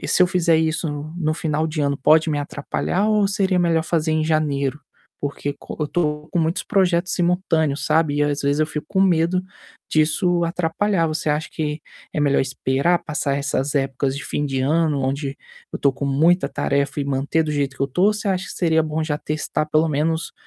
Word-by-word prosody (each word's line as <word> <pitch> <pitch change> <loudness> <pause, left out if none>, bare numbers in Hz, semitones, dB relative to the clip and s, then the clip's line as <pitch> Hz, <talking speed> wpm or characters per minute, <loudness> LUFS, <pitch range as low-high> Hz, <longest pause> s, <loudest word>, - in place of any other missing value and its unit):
e - - -5
se - - +4
eu 180 - +6
fizer 170 -3 +3
isso 160 0 0 0.3
no 155 -3 0
final 155 -1 -1
de 155 -1 -3
ano, 140 0 0
pode 155 +3 +4
me 145 - 0
atrapalhar 150 +7 -2
ou 210 -2 +3
seria 190 -2 +1
melhor 165 -2 +2
fazer 160 -1 0
em 155 - +1
janeiro? 150 -3 0 0.4
Porque 145 0 -3
co - - -9
eu - - +2
estou 150 -1 -2
com 175 - +1
muitos 165 +5 -1
projetos 180 -2 +1
simultâneos, 165 -5 +1
sabe, 155 -2 +2
e 145 - +2
às 145 0 -1
vezes 140 +1 +1
eu 155 - +3
fico 150 -1 -5
com 190 - 0
medo 180 -1 +3 0.5
disso 170 +3 +2
atrapalhar. 170 +2 0
Você 155 -1 -1
acha 150 +2 -1
que 150 -1 -3 0.3
é - - -3
melhor 140 -1 +3
esperar 135 +6 0
passar 145 -3 -1
essas 140 0 -1
épocas 135 0 -1
de 140 - -6
fim 145 - -2
de 135 -2 -2
ano, 150 0 +1
onde 135 +1 -2 0.4
eu - - -2
estou 140 -1 +2
com 135 - -5
muita 150 +3 +3
tarefa 140 0 -1
e - - -1
manter 140 +4 0
do 150 - -2
jeito 140 -2 -1
que - - -3
eu 135 - +2
estou, 180 +8 +2
ou 210 - +4
você 210 - -5
acha 190 -1 -1
que - - -9
seria 160 -2 +2
bom 155 0 -2
já 150 -2 -1
testar 155 0 -2
pelo 155 +1 +2
menos 160 +3 -1
155 Hz, 210 wpm, -21 LUFS, 145-170 Hz, 0.5 s, eu